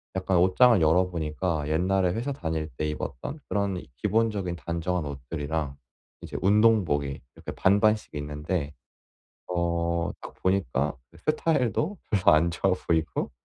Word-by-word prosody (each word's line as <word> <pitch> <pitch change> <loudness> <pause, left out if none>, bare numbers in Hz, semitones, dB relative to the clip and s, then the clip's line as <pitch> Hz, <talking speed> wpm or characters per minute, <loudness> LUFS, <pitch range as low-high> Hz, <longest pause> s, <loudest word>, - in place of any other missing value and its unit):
약간 95 0 +1
옷장을 95 +6 +5
열어보니까 80 -1 +1
옛날에 90 +4 +2
회사 120 +7 -2
다닐 80 - -3
때 75 - -1
입었던 75 - -5
그런 100 -2 -1
기본적인 105 - 0
단정한 85 0 -2
옷들이랑 70 +2 -4 0.5
이제 - - -6
운동복이 95 -10 +3 0.2
이렇게 - - -7
반반씩 105 +3 +2
있는데 75 +1 -3 0.7
어 85 -1 0 0.5
딱 - - -9
보니까 95 -8 +1 0.3
스타일도 155 - +1
별로 95 -4 +4
안 85 +2 +3
좋아 95 +3 +1
보이고 80 -2 0
90 Hz, 295 characters per minute, -27 LUFS, 80-100 Hz, 0.7 s, 옷장을